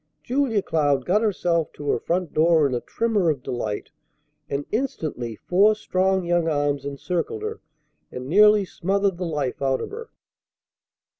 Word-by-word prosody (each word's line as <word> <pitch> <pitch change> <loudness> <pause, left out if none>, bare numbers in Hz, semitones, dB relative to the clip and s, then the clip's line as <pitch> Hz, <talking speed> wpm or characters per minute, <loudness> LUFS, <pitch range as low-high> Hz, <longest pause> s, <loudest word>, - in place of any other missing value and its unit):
Julia 245 -6 0
Cloud 145 -5 +1
got 200 +4 +2
herself 175 -6 0
to 145 - -8
her - - 0
front 175 -1 -2
door 160 -1 +4
in 135 - 0
a 120 - -1
tremor 215 -7 0
of 140 -5 -2
delight, 110 -4 -4 0.6
and 140 +1 -2
instantly 155 - -3
four 200 - +3
strong 190 -2 0
young 175 -1 +1
arms 145 -2 0
encircled 175 - -3
her, 435 +1 -5 0.5
and 125 0 -6
nearly 210 +6 +5
smothered 195 0 -1
the 180 - -2
life 145 -6 -3
out 135 -1 +1
of - - -6
her. 460 +2 -8
175 Hz, 155 wpm, -24 LUFS, 145-205 Hz, 0.6 s, nearly